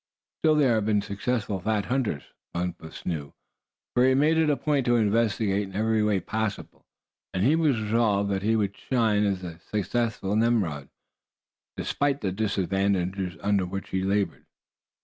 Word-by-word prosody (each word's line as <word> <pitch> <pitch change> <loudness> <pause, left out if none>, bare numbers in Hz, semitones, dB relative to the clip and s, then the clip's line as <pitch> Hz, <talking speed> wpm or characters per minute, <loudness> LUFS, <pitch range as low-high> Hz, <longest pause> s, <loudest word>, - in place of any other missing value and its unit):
Still, 155 -1 +4
there 140 -5 +4
have 110 -2 0
been 105 -2 +2
successful 100 0 -2
fat 105 +1 0
hunters. 120 - -1 0.3
Bumpus 85 -2 -5
knew, 75 -5 -4 0.6
for 125 - +3
he 130 - +5
had 130 - +3
made 155 +3 +4
it 160 -1 +3
a 145 - +2
point 145 +1 +1
to 120 - +4
investigate 105 -2 +2
in 95 - -12
every 110 +1 +2
way 105 -2 +2
possible, 110 +3 -4 0.5
and 90 - +1
he 140 +8 +4
was 150 -8 +2
resolved 105 -2 +1
that 95 -1 0
he 110 +3 +2
would 100 -2 0
shine 110 -5 +1
as 95 -2 -2
a 85 -2 -7
successful 105 +1 -1
Nimrod, 105 -11 +1 0.9
despite 145 -1 0
the 95 - -1
disadvantages 95 -2 -1
under 100 -3 +1
which 95 +2 -5
he 95 - 0
labored. 100 +1 -1
105 Hz, 165 wpm, -26 LUFS, 95-115 Hz, 0.9 s, he